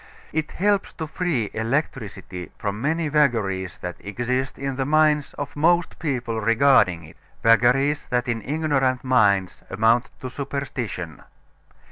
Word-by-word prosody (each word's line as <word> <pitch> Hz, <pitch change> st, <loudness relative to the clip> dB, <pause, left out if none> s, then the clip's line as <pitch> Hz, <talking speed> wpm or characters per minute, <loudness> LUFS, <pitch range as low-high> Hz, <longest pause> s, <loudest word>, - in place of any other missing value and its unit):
It 155 Hz, 0 st, -2 dB
helps 200 Hz, +1 st, +1 dB
to 160 Hz, -, -5 dB
free 155 Hz, -, -2 dB
electricity 110 Hz, -, -3 dB
from 105 Hz, 0 st, -3 dB
many 160 Hz, +3 st, 0 dB
vagaries 110 Hz, -11 st, +1 dB
that 90 Hz, 0 st, -5 dB
exist 125 Hz, +5 st, -2 dB
in 135 Hz, -1 st, -3 dB
the 135 Hz, -, -1 dB
minds 150 Hz, 0 st, +2 dB
of 145 Hz, -, -6 dB
most 170 Hz, +3 st, +2 dB
people 125 Hz, -7 st, -2 dB
regarding 115 Hz, -7 st, +4 dB
it; 75 Hz, -, -15 dB, 0.3 s
vagaries 125 Hz, +6 st, +4 dB
that 125 Hz, 0 st, -1 dB
in 115 Hz, -1 st, -1 dB
ignorant 135 Hz, -3 st, 0 dB
minds 100 Hz, -8 st, +2 dB
amount 115 Hz, +4 st, +2 dB
to 130 Hz, -, -4 dB
superstition. 125 Hz, -, -5 dB
130 Hz, 130 wpm, -23 LUFS, 110-145 Hz, 0.3 s, regarding